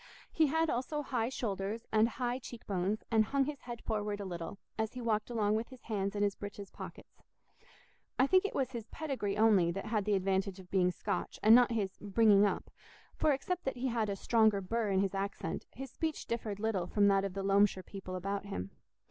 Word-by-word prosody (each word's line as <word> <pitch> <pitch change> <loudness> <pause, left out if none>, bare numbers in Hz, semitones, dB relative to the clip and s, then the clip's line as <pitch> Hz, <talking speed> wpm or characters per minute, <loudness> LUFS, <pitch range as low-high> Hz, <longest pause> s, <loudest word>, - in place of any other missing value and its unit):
He 315 -1 +3
had 320 +3 +2
also 295 +3 -1
high 245 -4 -1
shoulders 210 -2 -3
and 220 +1 +4
high 245 +1 -2
cheek 240 -2 -10
bones 195 +2 -1
and 220 -1 +5
hung 275 +3 +1
his 290 -1 -5
head 240 -1 -8
forward 210 -2 -2
a 200 - -4
little, 175 +1 -5 0.2
as 220 0 -2
he 250 - -6
walked 220 -2 0
along 215 -3 +1
with 220 +2 0
his 260 -2 -13
hands 200 -2 -2
in 205 - +1
his 200 -1 +2
breeches 205 -1 -8
pockets. - - -11 1.0
I 260 - +5
think 370 +6 +4
it 410 - -3
was 265 -2 0
his 230 -3 -6
pedigree 255 -11 -3
only 210 -6 +5
that 195 +3 -3
had 215 -2 0
the 210 -1 +2
advantage 190 0 0
of 180 -1 -14
being 185 -2 +3
Scotch, 200 +3 -3
and 215 +1 +8
not 245 0 +7
his 200 -5 -2
"bringing 205 0 +5
up"; - - -3 0.4
for 310 - +3
except 355 +6 -1
that 265 - -2
he 260 +1 -1
had 225 -3 0
a 200 - -1
stronger 220 0 +3
burr 215 +3 -1
in 190 -1 +3
his 195 0 0
accent, 200 +1 -3
his 270 0 -8
speech 320 +1 -3
differed 220 -3 -3
little 205 -5 0
from 205 +2 +3
that 195 -1 +3
of 195 -1 -3
the 195 - -2
Loamshire 195 -1 +3
people 190 -2 -7
about 195 +2 -3
him. 95 - -5
210 Hz, 215 wpm, -33 LUFS, 195-240 Hz, 1.0 s, and